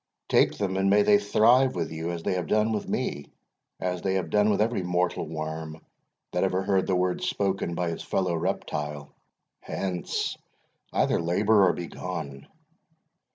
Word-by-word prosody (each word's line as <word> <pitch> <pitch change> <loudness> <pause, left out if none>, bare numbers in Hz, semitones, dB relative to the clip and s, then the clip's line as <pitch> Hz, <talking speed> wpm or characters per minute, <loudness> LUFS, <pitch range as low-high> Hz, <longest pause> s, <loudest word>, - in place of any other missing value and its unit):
Take - - +3
them, 95 -2 -1
and 95 0 +2
may 105 +1 +5
they 100 0 +5
thrive 120 +6 +4
with 85 -3 -2
you 80 +1 -4
as 85 -1 -4
they - - 0
have 90 -2 -2
done 110 +1 +2
with 105 -2 -3
me 70 0 -3 0.5
as 90 -1 -2
they 95 -1 0
have 90 -4 -2
done 105 0 +4
with 100 - +2
every 110 -1 +1
mortal 90 0 -1
worm 80 0 -5 0.5
that - - 0
ever 95 +1 +1
heard 95 -1 +1
the 95 - +2
word 90 0 0
spoken 95 -3 -1
by 85 -1 -1
his 80 - -5
fellow 95 -2 -1
reptile! 75 -2 -3 0.5
Hence 90 -2 -3 0.5
either - - +1
labour 100 +4 +4
or - - +2
begone!" 80 -5 -6
90 Hz, 165 wpm, -27 LUFS, 85-100 Hz, 0.5 s, may